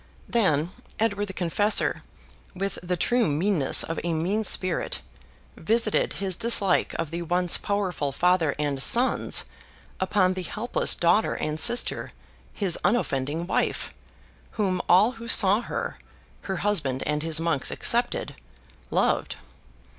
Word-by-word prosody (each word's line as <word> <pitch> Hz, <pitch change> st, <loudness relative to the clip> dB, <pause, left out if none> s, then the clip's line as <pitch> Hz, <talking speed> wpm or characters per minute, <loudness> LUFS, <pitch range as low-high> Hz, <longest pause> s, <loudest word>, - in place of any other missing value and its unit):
Then, 175 Hz, -8 st, 0 dB, 0.3 s
Edward 205 Hz, -2 st, -1 dB
the 190 Hz, -, -8 dB
Confessor, 195 Hz, +4 st, +2 dB, 0.5 s
with 195 Hz, +1 st, -4 dB
the 180 Hz, 0 st, -3 dB
true 240 Hz, +5 st, +1 dB
meanness 155 Hz, 0 st, +2 dB
of 165 Hz, -, -5 dB
a 170 Hz, -1 st, -2 dB
mean 190 Hz, +7 st, -1 dB
spirit, 185 Hz, -3 st, +2 dB, 0.6 s
visited 225 Hz, -1 st, 0 dB
his 190 Hz, -2 st, 0 dB
dislike 205 Hz, -3 st, +3 dB
of 165 Hz, -2 st, -4 dB
the 170 Hz, +1 st, -4 dB
once 175 Hz, +1 st, +2 dB
powerful 185 Hz, -8 st, -2 dB
father 175 Hz, -1 st, +1 dB
and 145 Hz, -2 st, -2 dB
sons 245 Hz, -, +2 dB, 0.5 s
upon 185 Hz, -1 st, +1 dB
the 185 Hz, -, -5 dB
helpless 215 Hz, +6 st, 0 dB
daughter 175 Hz, +6 st, +1 dB
and 155 Hz, 0 st, -4 dB
sister, 240 Hz, +9 st, +3 dB, 0.4 s
his 190 Hz, -5 st, 0 dB
unoffending 155 Hz, -, -1 dB
wife, -, -, -2 dB, 0.6 s
whom 185 Hz, -4 st, -1 dB
all 195 Hz, +7 st, +5 dB
who 230 Hz, -1 st, -11 dB
saw 205 Hz, -2 st, +5 dB
her -, -, -6 dB, 0.5 s
(her 190 Hz, -, -2 dB
husband 140 Hz, -11 st, -1 dB
and 150 Hz, 0 st, -2 dB
his 160 Hz, 0 st, 0 dB
monks 165 Hz, -5 st, 0 dB
excepted) -, -, 0 dB, 0.6 s
loved. -, -, 0 dB
185 Hz, 130 wpm, -24 LUFS, 160-205 Hz, 0.6 s, all